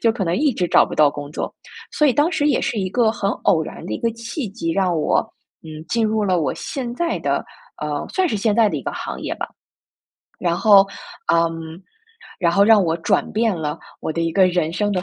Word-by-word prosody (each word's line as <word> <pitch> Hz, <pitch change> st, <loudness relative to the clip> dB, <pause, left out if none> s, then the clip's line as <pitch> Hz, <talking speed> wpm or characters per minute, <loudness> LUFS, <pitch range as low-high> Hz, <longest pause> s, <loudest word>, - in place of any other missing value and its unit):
就 230 Hz, -1 st, +4 dB
可 200 Hz, -5 st, -2 dB
能 170 Hz, +1 st, 0 dB
一 290 Hz, -1 st, +2 dB
直 180 Hz, -4 st, -1 dB
找 -, -, +5 dB
不 -, -, -6 dB
到 150 Hz, -2 st, +5 dB
工 145 Hz, 0 st, -7 dB
作。 -, -, -4 dB, 0.4 s
所 300 Hz, -, +3 dB
以 265 Hz, -, +4 dB
当 300 Hz, +6 st, +2 dB
时 290 Hz, -4 st, 0 dB
也 280 Hz, -, +2 dB
是 225 Hz, -, -2 dB
一 190 Hz, -1 st, -1 dB
个 230 Hz, -2 st, +3 dB
很 200 Hz, -3 st, -2 dB, 0.2 s
偶 160 Hz, -2 st, +4 dB
然 -, -, -9 dB
的 -, -, -5 dB
一 -, -, -4 dB
个 230 Hz, -, +1 dB
契 230 Hz, +2 st, -5 dB
机， 190 Hz, -5 st, -4 dB
让 185 Hz, -3 st, +1 dB
我， -, -, +2 dB, 0.5 s
嗯， 155 Hz, 0 st, -8 dB
进 230 Hz, -2 st, +1 dB
入 215 Hz, -1 st, 0 dB
了 180 Hz, -3 st, +2 dB
我 150 Hz, -, -1 dB
现 245 Hz, -3 st, -5 dB
在 340 Hz, +4 st, -1 dB
的 -, -, -1 dB, 0.4 s
呃， 150 Hz, -1 st, -3 dB
算 375 Hz, -2 st, +1 dB
是 215 Hz, -, -1 dB
现 210 Hz, 0 st, +1 dB
在 225 Hz, -2 st, +4 dB
的 -, -, -3 dB
一 -, -, -5 dB
个 -, -, -3 dB
行 -, -, -6 dB
业 -, -, -3 dB
吧。 -, -, -4 dB, 0.9 s
然 170 Hz, -1 st, 0 dB
后， 200 Hz, -1 st, +6 dB, 0.5 s
嗯， 165 Hz, +1 st, -1 dB, 0.6 s
然 170 Hz, -3 st, +2 dB
后 200 Hz, -, +4 dB
让 215 Hz, -2 st, +6 dB
我 165 Hz, 0 st, 0 dB
转 -, -, 0 dB
变 220 Hz, -1 st, +1 dB
了 150 Hz, -2 st, -3 dB, 0.2 s
我 160 Hz, -, -3 dB
的 165 Hz, -, -2 dB
一 165 Hz, -1 st, -1 dB
个 190 Hz, -2 st, +5 dB
人 175 Hz, -3 st, 0 dB
生 205 Hz, +3 st, 0 dB
的 180 Hz, -1 st, -1 dB
195 Hz, 255 characters per minute, -21 LUFS, 165-230 Hz, 0.9 s, 后